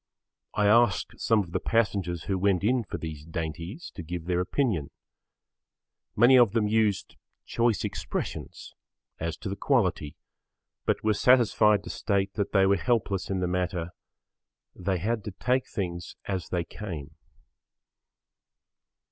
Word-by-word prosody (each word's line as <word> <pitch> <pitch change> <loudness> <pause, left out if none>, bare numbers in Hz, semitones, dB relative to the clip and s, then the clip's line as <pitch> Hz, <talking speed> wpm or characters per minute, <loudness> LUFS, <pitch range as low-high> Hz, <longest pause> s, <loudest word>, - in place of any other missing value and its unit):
I 105 - +2
asked 110 -1 +3
some 110 -2 +3
of 85 - -12
the - - 0
passengers 100 -7 0
who 95 -2 -1
went 100 -1 +2
in 120 +3 +2
for - - -6
these 75 -2 -6
dainties 85 - -5
to - - -7
give 85 0 -6
their 90 0 0
opinion. 90 - 0 1.3
Many 125 +4 +7
of 115 -4 +5
them 110 -2 +2
used 105 -2 0 0.3
choice 115 -2 +1
expressions - - -5 0.5
as 80 -1 -3
to - - -7
the 100 - -3
quality 95 - 0 0.7
but - - 0
were 110 0 +3
satisfied 105 -3 +4
to - - -6
state 100 -1 -1
that 100 -2 -2
they 95 -2 +4
were 100 +1 +4
helpless 105 -3 0
in 95 -1 -1
the 90 - +1
matter; 90 -1 -2 0.8
they 95 0 -1
had 110 +4 -1
to 105 - -4
take 125 +6 0
things 85 -5 -4
as 95 -3 -3
they 90 -2 0
came. 80 -6 -7
100 Hz, 145 wpm, -27 LUFS, 85-110 Hz, 1.3 s, Many